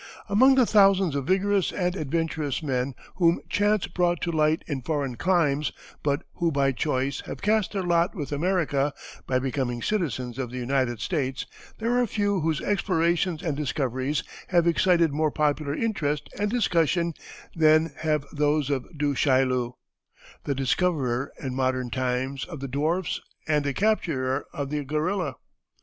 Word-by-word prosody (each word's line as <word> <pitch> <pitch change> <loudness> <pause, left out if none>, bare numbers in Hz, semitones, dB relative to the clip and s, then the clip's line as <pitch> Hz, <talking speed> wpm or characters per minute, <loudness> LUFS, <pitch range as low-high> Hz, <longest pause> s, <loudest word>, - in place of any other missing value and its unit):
Among 260 +7 +6
the 255 -2 +5
thousands 195 -5 +4
of 140 -2 -2
vigorous 195 0 +2
and 180 -1 -1
adventurous 160 -2 -2
men 130 -2 -1 0.2
whom 170 -2 +4
chance 205 -1 +2
brought 175 -1 0
to 170 - -1
light 155 0 +2
in 140 -4 -3
foreign 140 -3 -2
climes, 150 -2 +1 0.3
but 145 +2 0
who 170 -2 +1
by 140 -2 +2
choice 135 0 -1
have - - -7
cast 215 0 +2
their 195 -2 -1
lot 175 +3 +2
with 145 -7 -5
America, 145 -3 0 0.3
by 130 - +2
becoming 130 -2 -2
citizens 135 - -2
of 130 -3 -2
the 125 - -7
United 125 -2 0
States, 135 -6 -2 0.3
there 240 +2 +1
are 245 - +1
few 205 -2 0
whose 160 -2 0
explorations 175 -3 +1
and 160 -5 -1
discoveries 135 -1 -1 0.2
have 175 -2 +3
excited 170 -1 +3
more 155 +1 +2
popular 150 -1 0
interest 150 -10 -1
and 205 0 +1
discussion 170 - +1 0.4
than 155 0 +4
have 150 -2 0
those 150 -1 +1
of 135 -3 -1
Du 145 -1 +1
Chaillu, 130 -3 +2 0.7
the 140 - -1
discoverer, 135 -2 0
in 130 -2 -4
modern 130 -1 -1
times, 130 +1 -1
of 165 -5 -8
the 135 - -4
dwarfs 155 +7 -1 0.3
and 150 -1 +2
the 140 - +1
capturer 145 -11 0
of 140 -1 -4
the 150 -1 -1
gorilla. 155 +4 -1
150 Hz, 155 wpm, -26 LUFS, 135-180 Hz, 0.7 s, Among